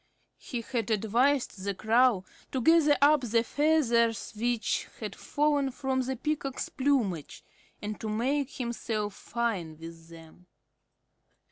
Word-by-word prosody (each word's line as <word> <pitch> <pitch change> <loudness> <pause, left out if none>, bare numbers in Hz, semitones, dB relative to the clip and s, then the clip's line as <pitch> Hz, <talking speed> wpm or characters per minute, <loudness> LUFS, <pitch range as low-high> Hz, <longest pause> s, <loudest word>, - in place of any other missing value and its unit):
He 240 -3 -5
had 230 -1 -3
advised 230 +1 +1
the 200 0 -2
Crow 220 -1 +3 0.3
to 260 - -1
gather 305 +2 +5
up 295 0 +6
the 230 -2 +1
feathers 240 -7 +2
which 235 +1 -1
had - - -5
fallen 290 -2 +1
from 265 0 -1
the 260 +1 -2
Peacock's 275 0 -3
plumage 240 - -1 0.4
and 210 0 -4
to 220 - -4
make 260 +6 0
himself 230 -4 -3
fine 200 -10 -3
with 165 0 -11
them. 165 +2 -15
235 Hz, 125 wpm, -29 LUFS, 210-270 Hz, 0.4 s, up